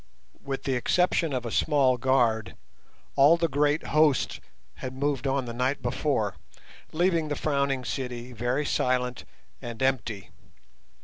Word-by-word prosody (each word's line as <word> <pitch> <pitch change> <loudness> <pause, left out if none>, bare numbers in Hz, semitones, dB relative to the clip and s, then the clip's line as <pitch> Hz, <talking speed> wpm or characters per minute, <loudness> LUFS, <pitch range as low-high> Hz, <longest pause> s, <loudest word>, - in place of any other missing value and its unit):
With 135 -1 -4
the 135 - -1
exception 165 +5 +1
of 125 -2 -2
a 115 - -4
small 140 -3 +3
guard, 120 -4 +1 0.6
all 145 +5 +6
the 170 0 +1
great 145 +1 +1
host 150 -3 +3 0.4
had 130 0 -6
moved 140 0 -1
on 135 -1 0
the 120 - -6
night 130 +4 -1
before, 120 - -1 0.5
leaving 170 -1 +1
the 145 - -2
Frowning 140 -4 0
City 125 +1 -4
very 120 +5 -1
silent 125 -2 0 0.4
and 115 -1 -7
empty. 115 -6 -1
135 Hz, 135 wpm, -27 LUFS, 125-145 Hz, 0.6 s, all